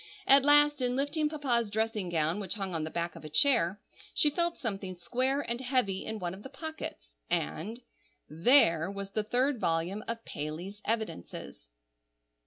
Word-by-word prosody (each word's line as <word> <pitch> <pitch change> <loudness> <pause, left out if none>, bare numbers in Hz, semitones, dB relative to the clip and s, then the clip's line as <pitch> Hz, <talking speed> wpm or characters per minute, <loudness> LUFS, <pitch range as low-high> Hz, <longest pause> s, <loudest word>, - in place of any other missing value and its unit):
At 275 0 +7
last, 295 0 +5
in 250 0 +1
lifting 295 +3 0
Papa's 250 -7 0
dressing 220 -3 -1
gown, 165 +2 0
which 195 -1 -2
hung 195 -3 -4
on 160 -2 -1
the 155 - -3
back 170 +1 -3
of - - -11
a 155 - -7
chair, 205 - +3 0.4
she 295 - +4
felt 340 +3 0
something 195 -5 -3
square 255 +10 0
and 235 -2 -4
heavy 250 -7 0
in 220 - -3
one 175 -3 -4
of 190 - -10
the 265 - -9
pockets; 285 - -7 0.2
and—there 165 - +1
was 200 0 -6
the 215 - 0
third 250 +4 +1
volume 170 +5 -1
of 230 0 -4
"Paley's 170 +8 -6
Evidences." 215 - -4
215 Hz, 165 wpm, -30 LUFS, 175-260 Hz, 0.4 s, At